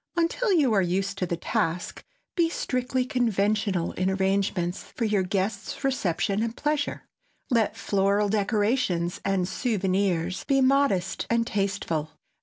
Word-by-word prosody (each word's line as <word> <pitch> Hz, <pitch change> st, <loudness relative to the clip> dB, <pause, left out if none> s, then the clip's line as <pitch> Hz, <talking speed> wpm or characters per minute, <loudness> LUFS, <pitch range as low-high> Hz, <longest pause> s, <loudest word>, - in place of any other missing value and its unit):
Until 345 Hz, +7 st, +1 dB
you 290 Hz, -, +4 dB
are 200 Hz, -, +4 dB
used 195 Hz, +2 st, -1 dB
to 180 Hz, -, 0 dB
the 170 Hz, -, -2 dB
task, 180 Hz, -2 st, -2 dB, 0.3 s
be 340 Hz, -3 st, +3 dB
strictly 255 Hz, -4 st, -1 dB
conventional 210 Hz, -6 st, +1 dB
in 185 Hz, +1 st, -1 dB
arrangements 190 Hz, -2 st, 0 dB
for 235 Hz, -, -4 dB
your 210 Hz, -2 st, +2 dB
guests' 200 Hz, +9 st, -2 dB
reception 205 Hz, -6 st, 0 dB
and 230 Hz, 0 st, -2 dB
pleasure. 295 Hz, -1 st, -1 dB, 0.5 s
Let 230 Hz, -3 st, +2 dB
floral 200 Hz, +1 st, +1 dB
decorations 205 Hz, -3 st, 0 dB
and 195 Hz, -2 st, +1 dB
"souvenirs" 190 Hz, -5 st, 0 dB
be 275 Hz, -1 st, +3 dB
modest 265 Hz, -9 st, +2 dB
and 230 Hz, 0 st, +2 dB
tasteful. 190 Hz, -7 st, -2 dB
200 Hz, 130 wpm, -26 LUFS, 185-245 Hz, 0.5 s, you